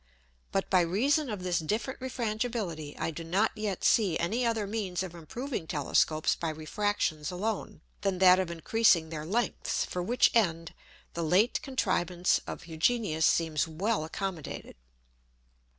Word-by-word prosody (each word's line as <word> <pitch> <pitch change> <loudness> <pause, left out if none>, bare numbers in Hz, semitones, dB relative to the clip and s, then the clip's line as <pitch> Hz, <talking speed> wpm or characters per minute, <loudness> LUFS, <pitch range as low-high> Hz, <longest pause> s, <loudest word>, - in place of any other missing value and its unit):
But - - 0
by 185 - +5
reason 255 - +1
of 205 -4 -4
this 180 -1 +1
different 215 - -2
Refrangibility, 220 - -3
I - - -2
do 165 +1 -7
not 190 +7 +1
yet 210 -3 -3
see 195 -8 +3
any 220 +9 0
other 225 -3 0
means 195 -4 -2
of 180 -3 -7
improving 175 - -5
Telescopes 155 +1 +1
by 165 - -3
Refractions 160 0 -1
alone, 195 -3 -3 0.2
than 195 -2 0
that 185 0 +7
of 185 -2 -1
increasing 170 -1 +3
their 155 -1 -5
lengths, 235 +6 -1
for 180 - -4
which 235 +8 +3
end 165 -7 +1 0.4
the 170 - -3
late 185 +9 +3
Contrivance 180 -9 +1
of - - -6
Hugenius 160 0 +1
seems 160 -2 +1
well 185 +4 -1
accommodated. 170 0 -5
185 Hz, 145 wpm, -29 LUFS, 165-220 Hz, 0.4 s, that